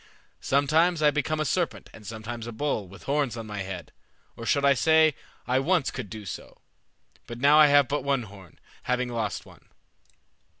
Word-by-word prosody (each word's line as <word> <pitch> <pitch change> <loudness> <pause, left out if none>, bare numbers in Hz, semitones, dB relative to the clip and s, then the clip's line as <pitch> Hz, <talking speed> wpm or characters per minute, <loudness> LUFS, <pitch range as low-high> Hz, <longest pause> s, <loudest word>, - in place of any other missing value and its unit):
Sometimes 155 +4 +2
I 150 - +6
become 155 +1 -1
a 155 - 0
serpent, 175 +4 -2
and 105 -3 -13
sometimes 115 +2 -6
a - - -5
bull, 110 -4 -2
with 95 +2 -14
horns 140 -4 -1
on 115 - -6
my 105 -1 -6
head. 95 -1 -6 0.4
Or 115 - -8
I - - -6
should 140 -1 +3
say 160 -1 +5 0.3
I 130 +1 +1
once 165 +1 +1
could 125 -6 -6
do 110 0 -8
so; - - -8 0.7
but 120 - -7
now 145 +4 +5
I 155 - +8
have 145 -2 +5
but 145 +2 -2
one 140 -3 0
horn, 95 -5 -14 0.2
having 125 0 -1
lost 115 -3 -3
one." - - -17
130 Hz, 185 wpm, -26 LUFS, 110-150 Hz, 0.7 s, I